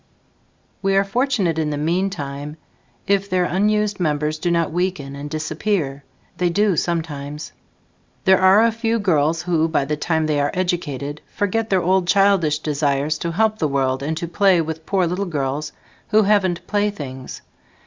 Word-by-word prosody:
We 195 0 +1
are 195 - +4
fortunate 200 - 0
in 155 -1 0
the 145 - -2
meantime 150 -3 -2 0.5
if 200 0 +1
their 185 -1 +2
unused 210 +2 +1
members 155 -2 0
do 175 - -1
not 170 -2 +1
weaken 170 -5 -2
and 145 +1 -6
disappear. 155 -1 -2 0.3
They 180 -1 +1
do 205 +2 +2
sometimes. 150 -3 -3 0.7
There 190 -1 +5
are 190 +4 +6
a 230 - +4
few 230 0 -1
girls 165 -5 +1
who, 165 -3 +1
by 155 -4 0
the 150 +2 -1
time 160 +1 0
they 150 -2 0
are 145 0 +1
"educated", 150 -6 -2
forget 220 +2 -1
their 190 -2 +2
old 185 0 +2
childish 195 -6 +3
desires 150 0 -1
to 170 0 -3
help 215 +3 +1
the 155 - +1
world 135 -2 0
and 155 +3 -2
to 170 - -3
play 190 +1 +3
with 160 0 -4
poor 190 -2 +2
little 180 +4 -2
girls 145 -3 -3 0.4
"who 215 0 +4
haven't 195 -4 +1
playthings". 155 -12 -3
170 Hz, 165 wpm, -21 LUFS, 150-195 Hz, 0.7 s, are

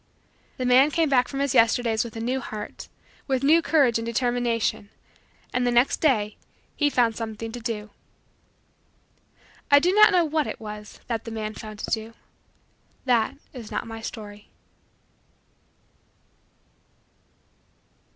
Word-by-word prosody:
The 255 - -2
man 255 +3 +5
came 320 0 +1
back 250 -3 +3
from 275 - -4
his 280 -2 0
Yesterdays 230 -1 +3
with 235 -2 -9
a - - -5
new 250 +4 -1
heart, 210 -3 -7 0.4
with 265 -1 0
new 320 +4 +5
courage 275 -9 +3
and 230 - -5
determination, 235 -3 -1 0.6
and 250 - +1
the 245 - +2
next 240 +3 +3
day 215 -9 +1 0.4
he 290 -1 +2
found 235 -5 +2
something 225 0 -5
to 245 - -7
do. 215 -2 -5 1.8
I 285 - +7
do 350 +6 +3
not 425 +1 +7
know 355 -3 +3
what 310 -1 0
it - - -6
was 210 -1 -9
that 230 -2 -3
the - - -5
man 215 -1 -4
found 215 -1 -9
to - - -6
do 225 0 -3 0.9
that 235 -4 +2 0.2
is 240 -5 -9
not - - -3
my 225 0 -8
story. 210 -2 -9
235 Hz, 140 wpm, -25 LUFS, 220-270 Hz, 1.8 s, I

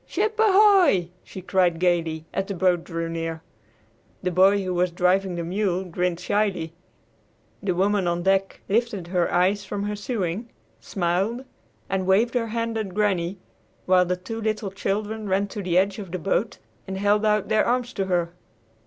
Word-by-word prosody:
"Ship 425 +4 0
ahoy!" 385 - +5
she 190 - -10
cried 180 -3 +2
gayly 165 -3 0
as 195 - -1
the 200 - -4
boat 180 -1 +2
drew 165 -1 -4
near. 165 -1 -4 0.8
The 180 - 0
boy 195 +3 +4
who 185 -1 -2
was 180 +1 +1
driving 180 +1 +1
the 170 - -3
mule 185 +1 -1
grinned 180 -1 -2
shyly. 185 -7 -1 0.9
The 185 -3 -1
woman 195 0 +1
on 175 0 -1
deck 195 +1 +1
lifted 205 -4 -1
her 180 -1 +1
eyes 190 +3 +2
from 200 +1 -4
her 210 0 -2
sewing, 205 0 -3 0.3
smiled, 195 +8 -1 0.4
and 190 -1 -2
waved 215 +5 +3
her 240 -2 0
hand 230 0 -2
at 195 -4 -5
Granny, 195 -3 0 0.5
while 185 -1 +4
the 180 0 0
two 225 +5 -6
little 215 -2 -2
children 205 +2 -3
ran 195 +2 +2
to 205 - -5
the 180 -2 0
edge 195 +2 +2
of 195 -3 -7
the 185 - -2
boat; 195 +5 -1 0.3
and 190 0 -4
held 205 +2 +2
out 210 -1 +2
their 215 0 +3
arms 245 0 0
to 195 - -1
her. 175 -2 0
190 Hz, 175 wpm, -24 LUFS, 180-210 Hz, 0.9 s, ahoy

